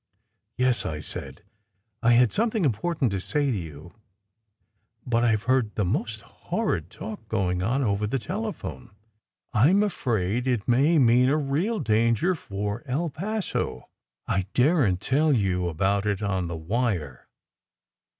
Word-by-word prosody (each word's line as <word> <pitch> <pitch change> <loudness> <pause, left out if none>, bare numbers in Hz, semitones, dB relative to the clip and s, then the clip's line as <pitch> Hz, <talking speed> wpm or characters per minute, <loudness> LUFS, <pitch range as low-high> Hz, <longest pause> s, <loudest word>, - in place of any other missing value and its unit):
" 110 -1 -52
"Yes," 125 -1 +2
I 75 -1 -4
said. - - -8 0.6
"I 120 +1 +4
had 120 -1 +5
something 220 -4 +1
important 140 +1 0
to 95 - -1
say 145 +8 0
to - - 0
you, 80 -1 -9 1.1
but 120 -1 +1
I 115 -2 +4
ve 105 - -4
heard 130 -4 +1
the 105 - 0
most 110 +3 -2
horrid 85 0 -3
talk 110 +2 -8
going 90 -5 0
on 125 +8 +1
over 105 -2 0
the 135 - 0
telephone. 185 - -5 0.6
I 120 +7 +5
m 200 +3 +4
afraid 120 - -1
it 120 -6 0
may 140 +7 +4
mean 125 -1 +5
a 150 - +3
real 155 +10 0
danger 115 - +2
for 105 - -4
El 150 +6 -1
Paso. 210 +7 -3 0.4
I 95 -1 -1
daren 130 - +3
t 95 - -10
tell 150 +3 +3
you 95 -6 +1
about 100 +5 0
it 100 0 -1
on 95 -3 -1
the 85 -1 -4
wire. 85 - -2
115 Hz, 155 wpm, -26 LUFS, 100-140 Hz, 1.1 s, had